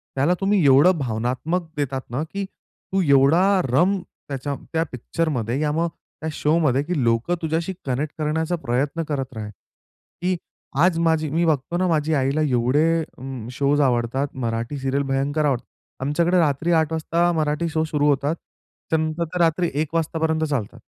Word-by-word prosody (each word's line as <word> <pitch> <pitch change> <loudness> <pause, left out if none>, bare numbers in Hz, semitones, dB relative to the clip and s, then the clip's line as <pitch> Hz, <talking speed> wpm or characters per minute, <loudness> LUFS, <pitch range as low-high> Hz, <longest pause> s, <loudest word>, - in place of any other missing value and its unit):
त्याला 140 +6 +3
तुम्ही 195 -2 +3
एवढं 145 +6 +6
भावनात्मक 130 +8 -2
देतात 135 -2 -1
ना 135 +6 -1
की 200 0 -2
तू 190 0 -6
एवढा 140 +6 +5 0.3
रम 185 +9 +3
त्याच्या 140 -4 -6 0.2
त्या 160 0 +2
पिक्चरमध्ये 125 -1 -2
या 150 -1 +1
मग 165 +2 +1 0.3
त्या 160 - -2
शोमध्ये 150 -4 +2
की 155 -4 -1
लोकं 115 +9 +1
तुझ्याशी 165 +3 -1
कनेक्ट 140 +3 -2
करण्याचा 160 +3 0
प्रयत्न 140 +7 0
करत 135 -4 -3
राहील. 105 -1 -6 0.7
की 180 +1 +1 0.5
आज 180 -2 +3
माझी 160 -2 +2
मी 165 +4 +1
बघतो 155 +2 0
ना 185 0 +1
माझी 160 -1 +1
आईला 140 +2 +1
एवढे 130 +1 +2 0.3
अं, 130 -3 -7
शोज 140 +3 +2
आवडतात, 125 +1 +1
मराठी 115 +2 -3
सीरियल 135 +1 0
भयंकर 140 +3 0
आवडतात. 130 -4 0 0.4
आमच्याकडे 170 +6 +2
रात्री 160 +1 +1
8:00 160 0 -2
वाजता 170 +2 +1
मराठी 155 +1 0
शो 160 0 0
सुरू 150 -2 0
होतात. 145 +3 +1 0.5
त्यानंतर 160 +1 0
तर 180 - -2
रात्री 170 +1 +2
1:00 160 +1 -4
वाजतापर्यंत 160 -1 0
चालतात. 140 -9 -2
150 Hz, 160 wpm, -23 LUFS, 135-165 Hz, 0.7 s, एवढं